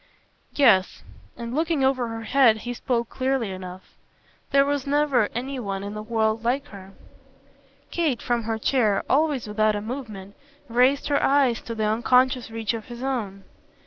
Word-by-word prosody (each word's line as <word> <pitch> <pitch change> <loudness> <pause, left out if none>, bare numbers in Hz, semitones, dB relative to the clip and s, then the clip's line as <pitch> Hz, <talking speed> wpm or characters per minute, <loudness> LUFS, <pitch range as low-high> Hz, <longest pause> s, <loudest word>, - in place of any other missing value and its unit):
"Yes." 215 -10 +3 0.3
And 235 0 -6
looking 315 -1 0
over 260 -2 +1
her 225 0 -6
head 240 -2 +4
he 245 - -3
spoke 235 -1 -1
clearly 260 -5 -1
enough. 185 0 -9 0.6
"There 275 0 +4
was 285 -1 -2
never 280 -6 +2
any 260 +2 -3
one 195 -4 -4
in 200 +1 -5
the 215 - -5
world 220 0 0
like 255 +4 -1
her." 195 -1 -12 1.0
Kate, 315 -8 0
from 235 -2 -1
her 225 0 -1
chair, 220 -4 +1
always 285 -3 +1
without 215 0 +1
a - - -1
movement, 215 -5 -7 0.3
raised 255 +4 +2
her 285 - +2
eyes 270 -4 +2
to 230 - -6
the 215 -1 -1
unconscious 250 +3 +2
reach 225 -1 -2
of 225 -2 -6
his 240 0 -8
own. 215 -8 -3
235 Hz, 165 wpm, -24 LUFS, 215-270 Hz, 1.0 s, head